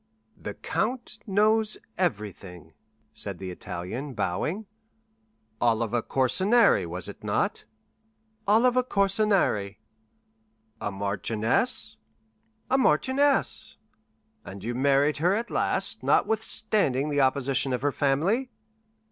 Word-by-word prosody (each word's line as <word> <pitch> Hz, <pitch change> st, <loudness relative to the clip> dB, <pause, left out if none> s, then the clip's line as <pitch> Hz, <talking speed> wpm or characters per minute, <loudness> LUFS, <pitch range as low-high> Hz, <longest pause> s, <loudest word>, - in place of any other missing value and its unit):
"The -, -, -7 dB
count 230 Hz, 0 st, -3 dB
knows 215 Hz, +2 st, +3 dB, 0.2 s
everything," 100 Hz, -, -4 dB, 0.4 s
said -, -, -4 dB
the 95 Hz, -1 st, -6 dB
Italian, 105 Hz, +9 st, -6 dB
bowing. 110 Hz, -, -2 dB, 1.0 s
"Oliva 115 Hz, 0 st, +1 dB
Corsinari, 185 Hz, -, +3 dB
was 90 Hz, +2 st, -6 dB
it -, -, -10 dB
not?" -, -, -1 dB, 0.8 s
"Oliva 245 Hz, +4 st, +4 dB
Corsinari!" 195 Hz, -, +1 dB, 1.0 s
"A -, -, -1 dB
marchioness?" 100 Hz, +3 st, 0 dB, 0.7 s
"A 265 Hz, -, +4 dB
marchioness!" 265 Hz, -, +2 dB, 0.7 s
"And 95 Hz, 0 st, -9 dB
you 120 Hz, +2 st, -2 dB
married 140 Hz, +3 st, +2 dB
her 175 Hz, +6 st, +2 dB
at 235 Hz, +2 st, -3 dB
last, -, -, -1 dB
notwithstanding 210 Hz, -, +1 dB
the 145 Hz, -1 st, +2 dB
opposition 135 Hz, 0 st, +2 dB
of 125 Hz, 0 st, -2 dB
her 145 Hz, -, +2 dB
family?" 165 Hz, -, +1 dB
140 Hz, 95 wpm, -26 LUFS, -, 1.0 s, Oliva